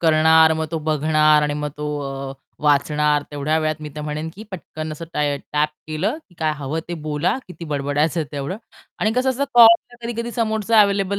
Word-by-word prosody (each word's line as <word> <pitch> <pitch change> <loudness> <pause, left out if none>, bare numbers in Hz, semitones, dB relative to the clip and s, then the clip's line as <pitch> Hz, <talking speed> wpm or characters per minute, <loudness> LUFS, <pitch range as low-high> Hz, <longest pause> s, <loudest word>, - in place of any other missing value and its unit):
करणार, 160 0 +5
मग 160 0 -2
तो 165 - -2
बघणार 155 0 +3
आणि 150 0 0
मग 150 0 -3
तो 150 0 -4 0.4
अ, - - -6 0.3
वाचणार 150 0 +2
तेवढ्या 150 +2 0
वेळात, 155 -1 -1
मी 150 - -6
तर - - -4
म्हणेन 150 +1 -4
की 210 - -10
पटकन 155 -4 -6
असं 160 +2 -7
ट - - -6 0.4
टॅप 150 +1 +2 0.2
केलं 160 - -1
की 175 - -23
काय 155 -1 +1
हवं 145 +3 -3
ते 175 - -3
बोला 150 +6 0
किती 180 -2 -9
बडबडायचं 150 +2 0
तेवढं 145 +6 -4 0.4
आणि 215 - +1
कसं 260 +1 +2
असतं 265 +2 -1
कॉल 230 0 +7
कधी-कधी 235 0 -4
समोरचा 220 -1 +2
अव्हेलेबल 200 -1 +2
155 Hz, 190 wpm, -21 LUFS, 150-200 Hz, 0.4 s, कॉल